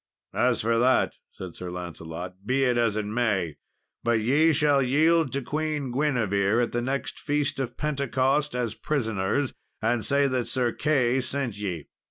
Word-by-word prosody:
"As - - +2
for 115 +1 +2
that," 130 +2 +3 0.2
said 90 -3 -8
Sir 90 - -7
Lancelot, 90 0 -6
"be 135 +1 +2
it 125 -2 +2
as 115 -3 +1
it 105 - -1
may, 105 -8 0 0.5
but 115 -1 +2
ye 145 +9 +4
shall 145 -2 +3
yield 155 +3 +3
to 140 -1 -1
Queen 150 -2 -2
Guinevere 120 -6 +1
at 115 - -2
the 120 - -1
next 135 +3 -3
feast 145 -2 -1
of 125 -2 -3
Pentecost 140 -1 0
as 120 -3 -1
prisoners, 120 -1 -1 0.3
and 115 0 0
say 140 +5 +2
that 130 -2 -1
Sir 125 -3 +1
Key 130 -4 +1
sent 130 -3 -3
ye." 95 -7 -4
125 Hz, 165 wpm, -26 LUFS, 110-140 Hz, 0.5 s, ye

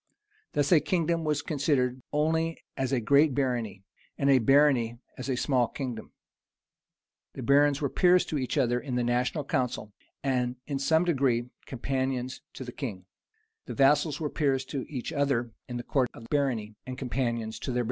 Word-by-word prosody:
Thus, 145 +2 +1
a 170 - +7
kingdom 170 0 0
was 150 -2 0
considered 135 -4 0
only 160 +2 +1 0.2
as 135 -1 -1
a 130 - +2
great 140 +4 +4
barony, 120 -8 -1 0.3
and 140 0 +3
a 135 - +6
barony 130 -2 +4 0.2
as 130 - -6
a 130 - 0
small 125 -2 +2
kingdom. 125 -5 -6 1.2
The 130 - -6
barons 140 +3 +4
were 140 - +1
peers 180 -1 +4
to 150 - -2
each 130 - -2
other 120 0 +2
in 130 -1 -4
the 125 - +1
national 125 +5 0
council, 125 - -2 0.3
and 125 -2 0
in 140 -2 -3
some 160 +5 +3
degree 130 -7 +1 0.2
companions 130 0 -2
to - - -6
the 125 - -7
king; 105 -9 -6 0.6
the - - -5
vassals 145 +2 +3
were 150 -3 -2
peers 135 -4 +1
to 135 -3 -3
each 130 -5 -5
other 135 -5 0 0.2
in 120 - -4
the 120 - -5
court 130 0 +1
of 115 -1 -11
barony, 125 -7 0
and 130 0 -5
companions 120 -4 -2
to 130 - -4
their - - -2
baron. - - +2
135 Hz, 175 wpm, -28 LUFS, 125-145 Hz, 1.2 s, a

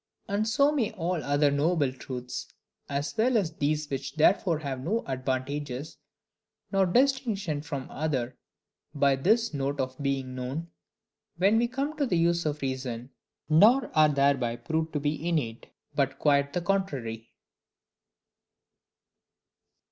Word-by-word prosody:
And 210 +1 0
so 280 +6 +4
may 265 -8 0
all 175 -4 -2
other 145 0 +3
knowable 145 -1 +1
truths, 125 -1 -6 0.4
as 140 +1 -2
well 235 +2 +3
as 185 -6 0
these 150 +1 0
which 135 -1 -4
therefore 165 +1 +3
have 140 -4 -4
no 220 +9 0
advantage 130 +2 -2 1.0
nor 195 -2 +3
distinction 220 - +1
from 140 -3 -5
other 135 -5 -2 0.6
by 140 -1 +4
this 220 - +2
note 140 0 -2
of 130 +1 -3
being 135 -2 -1
known 130 +7 -5 0.7
when 200 +5 +4
we 240 - +2
come 275 +5 -3
to 285 -3 +1
the 180 - +1
use 170 0 +2
of 150 -1 -3
reason; 130 -2 -4 0.4
nor 215 +13 +5
are 155 -1 +6
thereby 140 -4 +2
proved 160 +7 -2
to 150 - 0
be 150 +3 -1
innate, 120 -9 -2 0.3
but 135 -1 0
quite 140 -1 +2
the 180 - 0
contrary. 135 - -2
150 Hz, 135 wpm, -28 LUFS, 135-185 Hz, 1.0 s, are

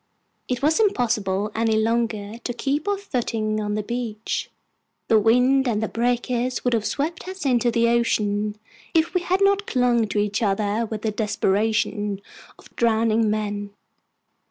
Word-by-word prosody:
It 250 +1 -2
was 310 +6 +3
impossible 220 - +1
any 225 -1 +1
longer 225 -1 -1
to 245 +1 -4
keep 280 +7 -2
our 405 -1 +1
footing 225 - -2
on 210 0 -2
the 215 - -2
beach. 230 -1 -3 0.6
The 220 - +6
wind 250 +5 +3
and 220 -3 +1
the - - 0
breakers 245 +1 -1
would 245 - +2
have 220 -2 +1
swept 320 +5 -3
us 375 -4 -6
into 245 -2 +3
the 235 0 +2
ocean 210 -3 +1 0.4
if 320 +1 +2
we 360 - +1
had 370 +2 +1
not 400 +1 +2
clung 245 -3 +2
to 205 - -4
each 205 +1 0
other 210 +2 0
with 215 -1 -5
the 220 - 0
desperation 210 -1 0 0.4
of - - -19
drowning 225 -1 +2
men. 205 -1 -3
230 Hz, 155 wpm, -23 LUFS, 210-250 Hz, 0.6 s, The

